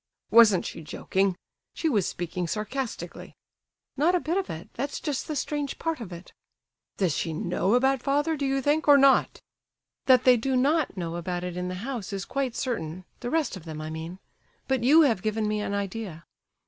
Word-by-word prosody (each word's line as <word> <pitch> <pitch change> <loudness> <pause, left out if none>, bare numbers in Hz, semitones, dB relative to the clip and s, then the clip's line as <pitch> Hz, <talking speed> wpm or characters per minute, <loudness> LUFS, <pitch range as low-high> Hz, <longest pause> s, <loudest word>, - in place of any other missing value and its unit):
"Wasn't 215 -6 +6
she - - -6
joking? 190 +5 -1 0.4
She 325 - -1
was 210 - +2
speaking 175 0 -3
sarcastically!" 220 +7 -5 0.6
"Not 325 +6 +3
a - - +3
bit 335 +1 -2
of 390 -1 -1
it; 160 +1 -7
that's 280 +4 -3
just 290 -4 -3
the 305 - -3
strange 290 0 -2
part 325 -3 -2
of 200 -5 -7
it." 170 +1 -10 0.6
"Does 180 -6 +1
she 165 - -2
know 180 +6 0
about 265 +1 +2
father, 295 +4 +1
do 280 -2 -1
you 270 0 0
think—or 295 0 +5
not?" 275 -1 +4 0.7
"That 255 -1 +6
they 250 -1 +6
do 260 +3 -1
not 290 -2 +1
know 170 -1 -3
about 175 +1 -3
it 180 -1 -4
in 180 0 -3
the 180 - -4
house 235 -7 -4
is 195 0 -3
quite 265 +1 -2
certain, 185 - -3
the 245 - -4
rest 315 -4 0
of 185 - -9
them, 155 -2 -6
I 155 0 -5
mean; 160 +3 -6 0.5
but 265 -3 0
you 300 +6 +7
have 235 - +3
given 215 +1 -1
me 210 0 -1
an 200 - -2
idea. 200 -4 -5
230 Hz, 195 wpm, -27 LUFS, 180-275 Hz, 0.7 s, you